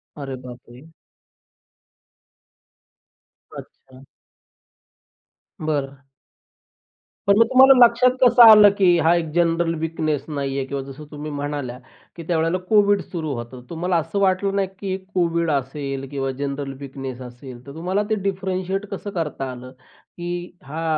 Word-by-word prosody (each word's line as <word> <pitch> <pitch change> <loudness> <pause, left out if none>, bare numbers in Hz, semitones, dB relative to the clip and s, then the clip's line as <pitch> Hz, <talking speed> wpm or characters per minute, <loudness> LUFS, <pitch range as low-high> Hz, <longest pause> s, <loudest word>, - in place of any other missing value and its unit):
अरे 135 -3 -6
बापरे! 125 +3 -13 2.7
अच्छा. 130 0 -14 1.6
बरं. 140 -3 -2 1.3
पण 200 +1 +5
मग 230 - +6
तुम्हाला 265 +3 +7
लक्षात 235 +2 +3
कसं 245 -1 +6
आलं 210 -2 +9
की 180 -3 +4
हा 165 +2 +5
एक 165 -2 -2
जनरल 170 -1 +1
वीकनेस 155 -2 -2
नाही 140 -2 -3
आहे. 135 - -2
किंवा 140 0 -4
जसं 150 +3 -11
तुम्ही 150 0 -7
म्हणाल्या 145 -3 -4 0.4
की, 170 - -8
त्यावेळेला 165 +1 +1
कोविड 205 -2 +4
सुरू 160 -5 -5
होतं. 120 +2 -8
तुम्हाला 175 +1 -1
असं 165 +5 -2
वाटलं 195 +1 +1
नाही, 195 -1 +1
की 190 -1 -3 0.2
कोविड 170 -2 0
असेल 135 0 -3
किंवा 135 -1 -2
जनरल 140 -1 -4
वीकनेस 135 -2 -7
असेल, 125 0 -11
तर 140 - -10
तुम्हाला 185 +5 -1
ते 220 - +2
डिफ्रेंटशिएट 190 +1 -3
कसं 200 +1 -5
करता 135 -4 -4
आलं? 125 +1 -10
की 175 +6 -12 0.3
हा 155 +4 -6
160 Hz, 130 wpm, -22 LUFS, 135-185 Hz, 2.7 s, आलं